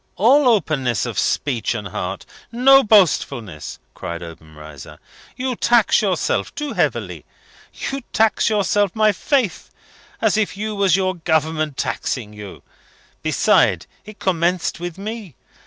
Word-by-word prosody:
"All 260 +8 +4
openness 150 - +1
of - - -3
speech 125 -4 -1
and 105 -3 -5
heart! 90 +2 -5 0.3
No 270 +3 +6
boastfulness!" 140 - +1 0.2
cried 85 0 -6
Obenreizer. 80 -3 -12 0.4
"You 255 -1 -2
tax 235 -1 +3
yourself 190 -5 -1
too 295 0 -4
heavily. - - -2 0.5
You 275 0 -5
tax 220 0 +2
yourself, 205 -2 +1
my 215 -1 +4
faith! 240 - -1 0.5
as 220 -1 +2
if 210 -2 -1
you 215 +1 -3
was 195 -3 +3
your 185 -1 0
Government 160 -3 -1
taxing 110 -5 -3
you! 105 -2 -10 0.6
Besides, - - +2 0.2
it 215 0 -12
commenced 175 -2 0
with 175 0 -6
me. 210 - -7
185 Hz, 125 wpm, -20 LUFS, -, 0.6 s, No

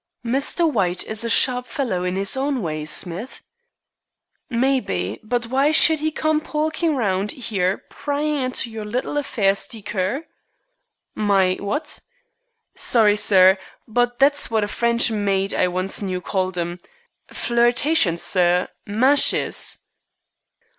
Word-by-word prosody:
"Mr. 275 +7 +1
White 185 - -1
is 220 +1 0
a 230 - -2
sharp 250 +2 +2
fellow 225 -11 -3
in 180 0 -2
his 195 +4 +1
own 270 -3 -2
way, 155 -2 -4
Smith." 180 - 0 1.1
"Maybe, 235 - -1
but 240 +2 -2
why 270 +5 +1
should 315 0 +4
'e 315 - +1
come 310 0 0
pokin' 315 +1 -1
round 200 -4 -1 0.2
'ere 185 -1 0
pryin' 295 +1 -3
into 255 -3 -2
your 220 -1 -6
little 245 +7 -3
affairs 215 -9 0
deecur?" 210 - -4 0.9
"My 195 -3 +2
what?" 295 +10 -3 0.7
"Sorry, 215 -4 +3
sir, 190 -2 +5 0.3
but 245 +2 0
that's 285 +2 +3
what 220 -2 0
a - - -1
French 235 +2 +1
maid 200 -2 -1
I 185 - +2
once 185 +3 -2
knew 185 -2 -3
called 185 0 -3
'em. 175 +1 -3 0.5
Flirtations, 240 - +1
sir. 180 -1 +1 0.2
Mashes." 255 +8 +2
220 Hz, 125 wpm, -21 LUFS, 190-270 Hz, 1.1 s, sir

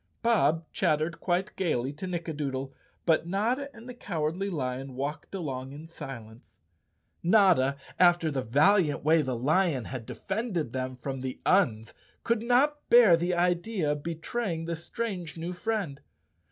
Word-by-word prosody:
Bob 165 -9 +3
chattered 160 -2 0
quite 185 +3 -1
gaily 140 -7 -1
to 170 +6 -6
Nickadoodle, 145 -6 -3 0.3
but 165 0 +2
Notta 235 +10 0
and 230 -1 -13
the 250 - -7
Cowardly 175 -3 -2
Lion 130 -5 -4
walked 150 +7 -4
along 135 -7 -4
in 150 +3 -9
silence. 120 -8 -10 0.6
Notta, 170 -8 +4 0.2
after 175 -3 +4
the 135 -2 -1
valiant 150 - +3
way 160 +2 +4
the 130 -4 -2
lion 150 - +1
had 125 -4 -6
defended 190 - -3
them 130 0 -3
from 130 +1 -5
the 130 -1 -5
Uns, 115 - +2 0.3
could 230 -1 +1
not 270 +5 +2
bear 235 -7 +8
the 175 +2 0
idea 175 -1 +1
of 150 0 -2
betraying 165 +2 -3
this 165 0 -4
strange 190 -9 -4
new 170 +2 -4
friend. 180 -7 -3
165 Hz, 145 wpm, -28 LUFS, 140-195 Hz, 0.6 s, bear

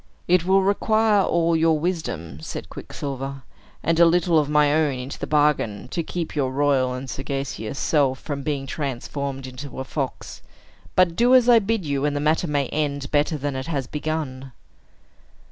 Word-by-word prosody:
"It 175 -1 +3
will 190 +1 +4
require 215 +1 +3
all 170 -2 +2
your 160 -1 +3
wisdom," 150 - -3
said - - -7
Quicksilver, 135 -1 -6 0.4
"and 165 0 +1
a 170 - +8
little 170 -1 +3
of 145 -1 -1
my 150 -1 +4
own 150 -4 +1
into 125 +2 -7
the - - -4
bargain, 145 -9 +1
to 170 - -2
keep 165 0 -5
your 135 -3 0
royal 135 -2 +1
and 130 +1 -6
sagacious 135 -3 -4
self 135 -1 +2
from 145 -2 -5
being 140 -1 -2
transformed 135 0 -4
into 130 +1 -8
a - - -2
fox. 135 0 -5 0.5
But 180 -2 +4
do 245 +5 +5
as 250 -2 +5
I 240 -2 +7
bid 215 -3 -1
you; 140 -1 -1
and 145 -1 0
the - - 0
matter 155 +4 +1
may 145 -2 0
end 145 -2 -2
better 150 +2 +1
than 145 -1 -3
it 130 0 -4
has 140 -5 -2
begun." 145 -3 -4
145 Hz, 180 wpm, -23 LUFS, 135-165 Hz, 0.5 s, a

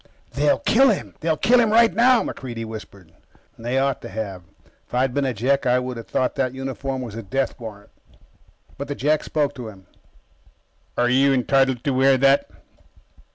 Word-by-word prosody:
"They'll 145 +1 +2
kill 270 +4 +4
him. 210 - -2
They'll 160 -1 0
kill 245 +9 +4
him 230 -2 +3
right 230 +1 +5
now," 245 +1 +4
MacReidie 120 -4 -6
whispered. 100 -5 -10 0.5
They 120 +3 -2
ought 135 -1 0
to - - -8
have. 100 -3 -5 0.5
If - - -8
I'd 125 0 +1
been 140 0 0
a - - 0
Jek, 135 +5 +1
I 125 0 +4
would 125 0 -3
have 115 - -9
thought 130 - 0
that 130 -1 -1
uniform 135 0 -4
was 115 -4 -7
a 115 - -6
death 135 +6 -2
warrant. 105 -3 -10 0.9
But 140 - -4
the 145 - -4
Jek 150 +3 +1
spoke 145 -2 -1
to 125 -4 -8
him: 95 -3 -13 1.1
"Are 120 - +2
you 135 +3 +3
entitled 135 -1 +1
to 140 - 0
wear 135 +1 +4
that?" 135 +1 +3
130 Hz, 185 wpm, -22 LUFS, 120-140 Hz, 1.1 s, right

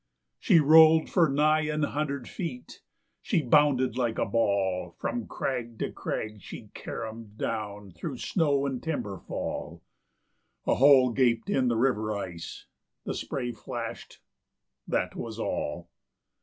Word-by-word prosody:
She 185 -8 +5
rolled 160 +1 +7
for 170 -4 +4
nigh 150 +2 +3
an 155 0 -1
hundred 140 -3 -2
feet; 135 -9 -6 0.4
she 160 - 0
bounded 130 -1 +3
like 120 -3 0
a - - +1
ball; 95 -5 0
From 240 - -3
crag 120 -3 -3
to - - -3
crag 105 -2 -4
she - - -10
carromed 110 -1 -7
down 105 -3 -4
through 125 - -6
snow 145 -5 +1
and 130 -3 -3
timber 105 - -3
fall;... - - -5 0.8
A - - +3
hole 130 -2 +6
gaped 115 -2 +1
in 130 -2 +2
the 120 -2 +1
river 110 -4 +1
ice; 85 -4 -7 0.4
the - - -3
spray 125 -3 -3
flashed 105 -3 -7 0.7
that - - -1
was - - -6
all. - - -3
125 Hz, 135 wpm, -28 LUFS, 110-150 Hz, 0.8 s, rolled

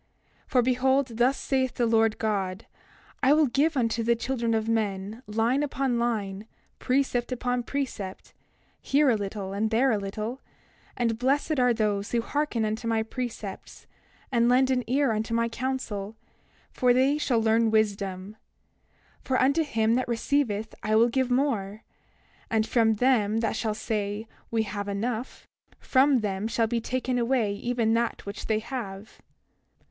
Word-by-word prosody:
28:30 - - -30
For 250 - +4
behold, 260 +2 +2
thus 255 +3 +3
saith 260 -2 -1
the 240 - +1
Lord 225 -1 +3
God: 195 -2 -2 0.6
I 275 +1 +5
will 310 0 +5
give 290 +4 +1
unto 230 -2 +1
the 235 +1 +2
children 235 -1 -1
of 220 0 -1
men 215 -1 -2
line 225 +6 +1
upon 270 -4 -1
line, 210 -3 -2 0.3
precept 255 -2 0
upon 245 0 -1
precept, 240 -8 -5 0.5
here 280 -1 +3
a - - +3
little 200 -1 -4
and 215 +2 0
there 250 +4 +3
a 215 - +1
little; 215 +6 -5 0.6
and 230 -2 0
blessed 280 +3 +1
are 250 -1 +4
those 210 -3 -1
who 235 - +2
hearken 285 -6 -1
unto 220 +2 -3
my 225 -1 +1
precepts, 225 -4 -6 0.5
and 235 -1 +3
lend 260 +1 +4
an 250 -1 +1
ear 270 +1 +2
unto 220 +1 -1
my 230 0 +2
counsel, 230 -4 -4 0.6
for 250 -1 +3
they 275 +3 +3
shall 245 -6 +1
learn 225 +1 +3
wisdom; 200 -2 -1 0.9
for 260 - 0
unto 280 +5 +3
him 225 -6 +1
that 255 +2 0
receiveth 230 -3 -1
I 215 +1 0
will 230 +2 +5
give 260 +1 0
more; 225 -6 0 0.7
and 220 -1 +1
from 225 -1 +2
them 225 -2 +2
that 225 - -1
shall 215 -2 -1
say, 210 0 -3 0.2
We 225 -1 +1
have 205 -1 -5
enough, 220 +5 -3 0.3
from 265 -1 +3
them 200 0 -2
shall 230 0 +1
be 230 +1 -1
taken 255 +1 -1
away 235 -4 +1
even 230 +1 0
that 230 0 -1
which 200 +1 -6
they 220 - +2
have. 220 -3 -7
230 Hz, 160 wpm, -27 LUFS, 215-255 Hz, 0.9 s, I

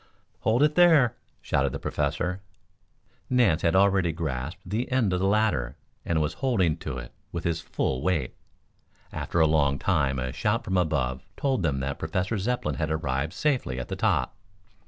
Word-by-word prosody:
"Hold 115 +5 +2
it 150 0 +3
there!" 160 -8 +5 0.3
shouted - - 0
the - - -4
Professor. 90 +2 -2 0.9
Nance 115 -11 +3
had 85 +2 +2
already 95 -3 +4
grasped 80 +3 -4
the 110 +8 -2
end 120 -7 +2
of 90 - +1
the 95 - +1
ladder 100 - +1 0.3
and 85 -2 0
was 75 0 0
holding 100 - +2
to 75 -5 -5
it - - -8 0.2
with 85 - -4
his 85 -1 -1
full 65 -5 -2
weight. 80 -8 0 0.8
After 85 - -2
a 80 - +6
long 70 -3 +2
time 70 -6 +1
a 65 0 -3
shout 115 +4 0
from 95 -4 -2
above 65 -8 0 0.2
told 135 -6 0
them 70 -6 0
that 70 +1 -3
Professor 90 +7 -1
Zepplin 95 - -1
had 75 - -1
arrived 75 -1 -1
safely 130 - 0
at 60 - -6
the - - -2
top. 65 - 0
85 Hz, 175 wpm, -26 LUFS, 70-105 Hz, 0.9 s, a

